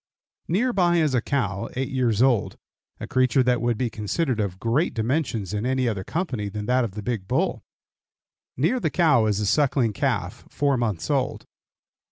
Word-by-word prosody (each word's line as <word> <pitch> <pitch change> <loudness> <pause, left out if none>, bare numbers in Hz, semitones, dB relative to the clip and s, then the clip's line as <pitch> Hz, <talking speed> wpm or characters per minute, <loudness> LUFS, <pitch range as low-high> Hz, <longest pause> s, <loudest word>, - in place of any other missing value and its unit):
Near 235 +9 +1
by 175 -4 +3
is 155 -4 +2
a 125 - +2
cow 105 -8 -2
eight 130 +1 -2
years 125 -4 +2
old, 125 -6 +1 0.4
a - - -5
creature 130 0 +2
that 125 -1 +1
would 120 -2 0
be 120 -1 -1
considered 115 - -1
of 100 -3 -2
great 120 - 0
dimensions 115 - -1
in 105 +1 -2
any 130 0 0
other 105 -5 -2
company 125 - -3
than 105 +1 -5
that 125 +2 +2
of 105 -4 -4
the 105 - -5
big 110 -5 -3
bull. - - 0 1.0
Near 165 - +1
the 160 - 0
cow 150 -10 +3
is 105 -1 0
a 105 - -1
suckling 130 -2 +2
calf, - - -2
four 140 -1 +1
months 105 -10 -2
old. - - -1
125 Hz, 185 wpm, -24 LUFS, 105-140 Hz, 1.0 s, by